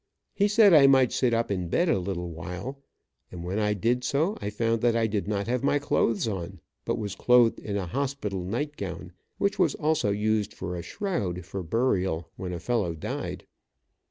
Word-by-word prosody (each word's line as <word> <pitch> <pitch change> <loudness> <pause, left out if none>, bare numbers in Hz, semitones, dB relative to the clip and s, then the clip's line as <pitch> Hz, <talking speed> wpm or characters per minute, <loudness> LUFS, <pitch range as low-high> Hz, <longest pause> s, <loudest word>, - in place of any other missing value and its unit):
He 205 - +2
said 210 -2 +6
I 145 -3 +8
might 130 -2 +5
sit 125 -2 +1
up 115 -2 0
in 90 -3 -1
bed 175 - +2
a 160 - +2
little 90 -2 -4
while, 90 +12 -6 0.5
and 85 -2 -7
when 95 +4 -2
I 105 -1 +1
did 120 +5 0
so 160 +11 +1
I 100 - -2
found 115 +2 0
that 120 -1 +3
I 115 -1 +2
did 105 -2 -2
not 100 -1 -1
have 125 +1 -1
my 145 - +3
clothes 115 -6 +1
on, 95 -3 -4 0.3
but - - -1
was 105 -3 -4
clothed 125 -1 +4
in 100 -1 -3
a 95 - -2
hospital 105 -3 -3
night 135 +11 -3
gown, 90 -2 -6 0.3
which 200 -1 0
was 170 -6 +3
also 155 -8 +1
used 105 0 0
for 90 -1 -5
a 85 - -4
shroud 90 - -3
for 95 +1 -5
burial 95 -4 0
when 90 -1 -5
a 85 - -4
fellow 95 -3 -1
died. 80 - -5
105 Hz, 200 wpm, -27 LUFS, 95-130 Hz, 0.5 s, I